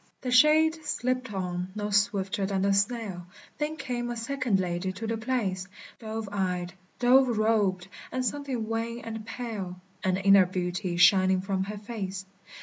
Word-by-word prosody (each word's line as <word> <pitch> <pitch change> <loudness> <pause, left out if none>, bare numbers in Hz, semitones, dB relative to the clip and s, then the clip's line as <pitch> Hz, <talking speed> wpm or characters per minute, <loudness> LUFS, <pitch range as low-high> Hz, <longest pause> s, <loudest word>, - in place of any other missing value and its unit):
The 255 - -3
shade 315 +4 +5
slipped 255 -4 -1
on, 180 -1 -3
no 210 0 -3
swifter 200 -1 +1
than 195 -1 0
the 200 0 +3
snail; 200 -4 -1 0.3
There 300 +1 -1
came 240 -5 -3
a 240 - -3
second 245 -4 0
lady 180 0 -1
to 215 +5 -6
the 225 +1 -1
place, 220 -6 -2 0.3
Dove 220 -1 -5
eyed, 180 -3 -2 0.2
dove 250 -1 +4
robed, 205 -4 +1 0.2
and 255 0 -1
something 260 -3 -2
wan 230 +1 -3
and 225 -1 -6
pale, 205 -8 -5 0.2
An 185 -1 +1
inner 195 -1 +6
beauty 180 0 -2
shining 185 +1 +5
from 190 0 -1
her 210 +1 -6
face. 200 -3 -5
210 Hz, 155 wpm, -28 LUFS, 190-240 Hz, 0.3 s, inner